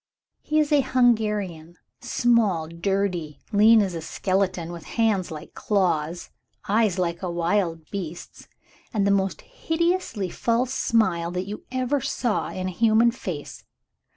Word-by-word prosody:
"He 305 - -1
is 305 -1 +2
a 290 -1 +5
Hungarian. 210 -10 +1 0.2
Small, 215 -9 +2
dirty, 175 -2 -2
lean 215 +1 +6
as 190 -2 -3
a 165 - -4
skeleton, 185 0 -1
with 170 -2 -9
hands 215 -5 +2
like 155 -1 -9
claws, 175 -5 -1 0.4
eyes 210 -2 +2
like 170 -2 -1
a 185 - -3
wild 170 -1 0
beast's, 175 -4 -7 0.4
and 210 -4 +1
the 200 - +3
most 195 -1 0
hideously 335 - -1
false 240 +2 0
smile 180 -9 +1
you 200 +3 -5
ever 260 +2 0
saw 235 -2 -1
in 185 - -4
a - - -2
human 225 +4 +4
face. 180 - -7
200 Hz, 135 wpm, -24 LUFS, 175-230 Hz, 0.4 s, lean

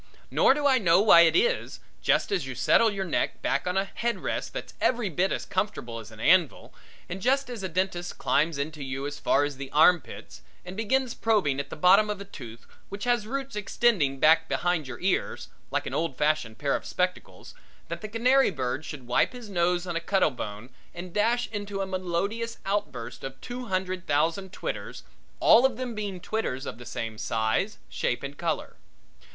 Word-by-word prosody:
Nor 265 - +5
do 295 0 -2
I 265 -2 +5
know 175 -4 +4
why 200 -5 +8
it 170 - +5
is, 480 +6 +1 0.2
just - - +2
as 180 -9 0
you 130 - -5
settle 230 - +4
your 195 -2 -3
neck 170 - -1
back 140 +5 0
on 180 +1 0
a 195 - +2
head 235 +4 -3
rest - - -2
that's - - -7
every 240 -5 +1
bit 180 +5 +1
as - - -2
comfortable 185 - -3
as 110 - -10
an 110 -1 -14
anvil, 175 +4 +2 0.3
and 190 +2 -6
just 265 +2 +1
as 235 -4 -6
a 190 - -3
dentist 175 0 -2
climbs 155 0 +1
into 150 +1 -4
you 135 +1 -4
as 145 0 -5
far 140 - +3
as 145 -2 -3
the 135 0 -6
arm 160 +4 +5
pits - - -11 0.2
and 180 +1 -7
begins 240 +4 0
probing 195 -12 +1
at 140 0 -4
the - - -6
bottom 195 +6 +5
of 210 -1 -3
a 200 - -7
tooth 120 - -11 0.2
which 200 +1 -6
has 240 -3 +1
roots 270 +1 -4
extending 195 - +1
back 160 +2 +5
behind 175 -5 0
your 125 -2 -7
ears, 185 0 -1 0.2
like - - -1
an - - -5
old 165 -5 -1
fashioned 150 -7 0
pair 140 -1 0
of - - -4
spectacles, 180 0 -3 0.3
that - - -5
the 215 - -5
canary 250 +5 +3
bird 135 -3 -3
should 150 -4 -8
wipe 125 - +2
his 245 -4 -9
nose 175 0 +1
on 175 -2 -4
a - - +1
cuttle 190 -2 +2
bone 110 0 -7 0.2
and 175 0 -8
dash 230 +4 +2
into 205 -2 -4
a 195 - 0
melodious 190 +5 -2
outburst 190 - -3
of 135 0 -7
two 250 +1 -6
hundred 185 -1 -2
thousand 165 +6 0
twitters, - - -5 0.4
all 240 - +7
of 265 -4 +2
them 250 -2 -4
being 205 -4 -4
twitters 175 -10 -3
of 110 - -6
the 120 - -10
same 110 -1 -5
size, 110 - 0
shape, 120 - -2
and 140 +1 -7
color. 165 -4 -2
180 Hz, 200 wpm, -27 LUFS, 145-210 Hz, 0.4 s, why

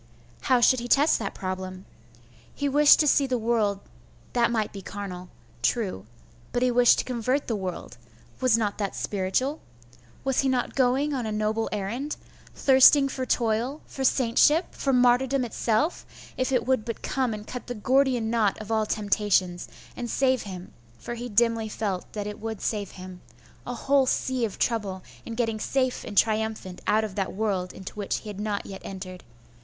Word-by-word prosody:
How 255 -3 +4
should 255 +1 +5
he 240 - -5
test 285 +5 +4
that 200 -3 -4
problem? 185 0 -5 0.7
He 285 - -1
wished 290 +1 +6
to 300 - +2
seethe 275 -1 +3
world 220 -4 +1 0.5
that 235 -1 +3
might 220 -3 -1
be 200 - -7
carnal. 185 -2 -7 0.3
True; 190 - -1 0.4
but, 245 - 0
he 250 - +3
wished 245 0 +5
to - - -1
convert 255 +3 -1
the 230 - -1
world.... 185 - -6 0.4
was 255 -3 +4
not 210 -2 -2
that 200 -2 -2
spiritual? 210 +10 -1 0.6
Was 270 -1 0
he 270 - +2
not 250 -2 0
going 270 +3 +2
on 250 -5 -2
a - - -3
noble 215 +1 -1
errand?.... 225 +9 -3 0.4
thirsting 275 +1 +6
for 260 -1 -4
toil, 240 +6 0
for 270 - -6
saintship, 265 +6 +3
for 275 - -1
martyrdom 250 +1 +3
itself, 235 +7 0 0.3
if 255 +1 -1
it 245 -3 +1
would 260 -3 +1
but 230 -1 -6
come 260 -3 0
and 210 -1 -6
cut 250 +2 -7
the 245 - -4
Gordian 250 0 +2
knot 220 -4 +1
of 215 0 -7
all 220 -1 +1
temptations, 200 -4 0 0.3
and 240 - -5
save 260 -1 +2
him 185 -2 -8 0.2
for 240 - -6
he 240 +1 -6
dimly 225 0 +2
felt 200 -4 -3
that 210 -1 -4
it 210 0 -6
would 220 -1 -5
save 205 -3 -2
him 185 -1 -10 0.5
a 245 - -3
whole 275 +2 +2
sea 255 -1 0
of 210 - -6
trouble 200 -6 -1 0.2
in 230 - -5
getting 225 -2 -1
safe 255 +2 -1
and 205 - -8
triumphant 220 -4 0
out 220 +1 +3
of 215 -3 -4
that 195 -1 -2
world 195 -3 -1
into 190 - -9
which 205 -2 -2
he 215 - -9
had 205 -1 -7
not 210 -1 -2
yet 195 -1 -8
entered 185 -1 -8
225 Hz, 180 wpm, -26 LUFS, 205-255 Hz, 0.7 s, wished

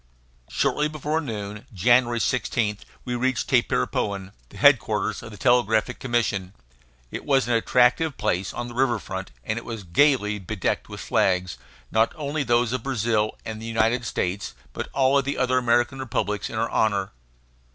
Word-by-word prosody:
Shortly 150 0 +1
before 155 +1 -2
noon 105 -6 -6
January 120 +4 +3
16 110 -4 0 0.3
we 125 - -3
reached 125 0 0
Tapirapoan, 95 +9 0 0.2
the - - -13
headquarters 110 -4 +3
of - - -9
the 105 - -11
Telegraphic 120 0 +2
Commission. 110 -7 -1 0.6
It - - -5
was 135 -5 +2
an 120 - +1
attractive 125 +6 +3
place, 90 +1 -1
on 120 - -5
the 120 - -9
river 125 -1 +2
front, 95 -2 -6
and 110 - -2
it - - -12
was 115 -3 -6
gayly 105 - +2
bedecked 95 0 -2
with - - -7
flags, 90 -2 +1 0.3
not 110 +1 +2
only 150 -1 -2
those 120 -2 +2
of 130 - -1
Brazil 115 -4 0
and 110 0 -6
the 115 - -6
United 115 +2 +1
States, 95 - -3 0.2
but - - -4
of - - -21
all 135 +1 +4
the 140 +1 -3
other 130 0 +2
American 120 +2 +1
republics, 105 -5 -2
in - - -7
our 115 +1 -1
honor. 100 -3 +1
115 Hz, 165 wpm, -24 LUFS, 105-130 Hz, 0.6 s, all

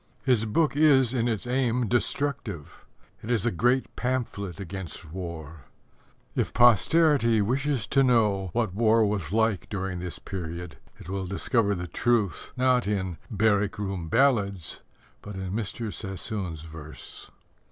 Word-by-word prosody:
His 125 -5 +3
book 145 +7 +1
is 135 -5 +5
in 120 -2 +1
its 115 -2 -2
aim 125 -1 +1
destructive. 120 - -1 0.3
It 110 - -8
is 115 -4 +1
a 120 - +2
great 125 +8 +1
pamphlet 115 -8 -3
against 95 -4 -7
war. 85 -5 -7 0.7
If - - -1
posterity 120 - +5
wishes 130 +3 0
to 135 - +4
know 105 -7 +2
what 110 -2 -1
war 110 +1 +4
was 100 -5 -2
like 110 -2 +1
during 95 -3 -3
this 90 -1 -5
period, 90 -2 -6 0.2
it - - -12
will 95 0 -3
discover 100 +2 +1
the 90 -1 -4
truth, 105 +1 0
not 125 -3 +3
in 95 -5 -2
Barrack 105 -2 +1
room 95 -5 -3
Ballads, 100 - +1 0.4
but 105 -1 -8
in 95 -1 -4
Mr. 110 +1 -3
Sassoon's 95 -5 -5
verse. 80 -2 -10
105 Hz, 140 wpm, -27 LUFS, 95-120 Hz, 0.7 s, is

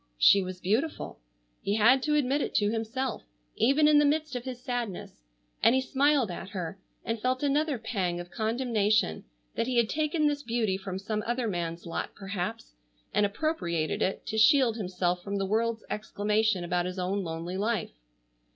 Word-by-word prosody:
She 195 - +6
was 185 -1 -6
beautiful. 225 - -1 0.4
He 200 - 0
had 235 +5 +5
to 300 +2 +1
admit 285 0 +2
it - - -3
to 205 0 +3
himself, 230 +3 -2 0.3
even 280 +6 +4
in 300 -1 +6
the - - +5
midst 300 0 +1
of 245 0 -4
his 255 -2 -5
sadness, 245 - -4 0.4
and 235 - +5
he 260 - +3
smiled 270 -4 +2
at 175 +2 -7
her, 185 -1 -5 0.3
and 225 -1 -2
felt 255 +3 0
another 290 0 +1
pang 195 -6 -2
of 175 0 -8
condemnation 220 - +1 0.3
that 230 - -1
he 255 -1 0
had 235 -2 +3
taken 305 +1 0
this 290 -1 +1
beauty 230 -6 0
from 190 -1 -5
some 210 +2 -2
other 240 0 0
man's 170 -3 -3
lot 170 - -4
perhaps, 185 - -5 0.4
and 210 - +3
appropriated 175 - -1
it 190 - -1
to 220 - -2
shield 250 -1 +5
himself 180 -4 -1
from 200 +2 -4
the 195 - 0
world's 225 +2 0
exclamation 210 -2 0
about 175 0 0
his 180 +1 -5
own 190 +2 -1
lonely 165 +2 -4
life. 215 -1 -1
220 Hz, 180 wpm, -28 LUFS, 190-255 Hz, 0.4 s, She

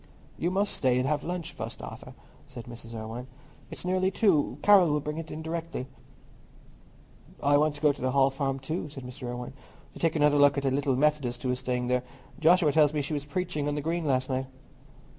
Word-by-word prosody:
"You 170 - -1
must 195 +2 0
stay 125 -2 +2
and 130 +1 +1
have 150 0 0
lunch 175 -1 -4
first, 110 +2 -6
Arthur," 125 +3 -9 0.3
said 125 -4 -9
Mrs. 115 -1 -10
Irwine. 115 +3 -6 0.4
"It's - - -7
nearly 185 +1 +2
two. 180 - +2
Carroll 195 -5 +7
will 150 0 +2
bring 150 +2 -4
it 165 -1 -7
in 160 - -6
directly." 165 -4 -4 1.6
"I 145 +1 +4
want 150 0 +2
to 145 - -10
go 150 -2 +4
to - - -12
the 130 - +1
Hall 135 +1 +3
Farm 135 0 -1
too," 155 +4 -4
said 135 -2 -9
Mr. 125 +1 -7
Irwine, 120 0 -5 0.5
"to 165 - +3
have 160 - -3
another 150 -1 +4
look 145 0 +5
at 140 - -1
the 135 - +1
little 135 0 +1
Methodist 135 -3 +1
who 130 - +1
is 125 - -2
staying 125 -1 -1
there. 125 0 +1 0.4
Joshua 165 -1 +5
tells 150 0 +4
me 145 - 0
she 150 - -3
was 145 -1 -3
preaching 170 -2 -2
on 145 - -1
the 150 - -2
Green 165 +3 -1
last 130 -1 +1
night." 130 0 -2
145 Hz, 215 wpm, -28 LUFS, 130-160 Hz, 1.6 s, Carroll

